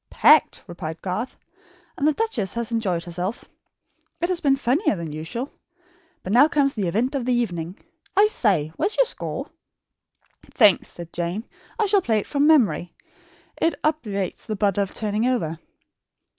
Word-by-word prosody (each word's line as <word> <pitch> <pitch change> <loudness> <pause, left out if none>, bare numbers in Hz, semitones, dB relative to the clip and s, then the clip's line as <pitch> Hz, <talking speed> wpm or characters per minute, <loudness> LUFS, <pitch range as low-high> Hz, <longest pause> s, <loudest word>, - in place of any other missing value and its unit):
"Packed," - - +4
replied 165 -2 -6
Garth, 195 +7 -3 0.6
"and 290 - +1
the 305 - +4
duchess 275 - -2
has 235 0 -3
enjoyed 190 -7 -1
herself. 180 +6 -4 0.7
It 345 - 0
has 365 -1 0
been 275 -3 +4
funnier 270 - +1
than 165 -4 -6
usual. 165 - -5 0.7
But 190 - -3
now 265 +5 +7
comes 280 -3 +2
the 200 -5 -2
event 230 - 0
of 275 -3 -1
the 250 +1 +1
evening. 180 -7 -2 0.4
I 410 - +7
say, 195 - +1
where - - +1
is 425 - -2
your - - +5
score?" - - -4 1.0
"Thanks," 210 -6 +5
said 170 -1 -10
Jane. 175 +5 -3 0.4
"I 435 - +3
shall 400 -1 +3
play 225 -9 +1
it 210 - -1
from 285 0 +1
memory. 240 - +3 0.7
It 330 - +2
obviates 215 - -2
the 215 - -2
bother 200 -1 +1
of 195 - -2
turning 215 +2 0
over." 165 -11 -1
220 Hz, 165 wpm, -23 LUFS, 180-280 Hz, 1.0 s, now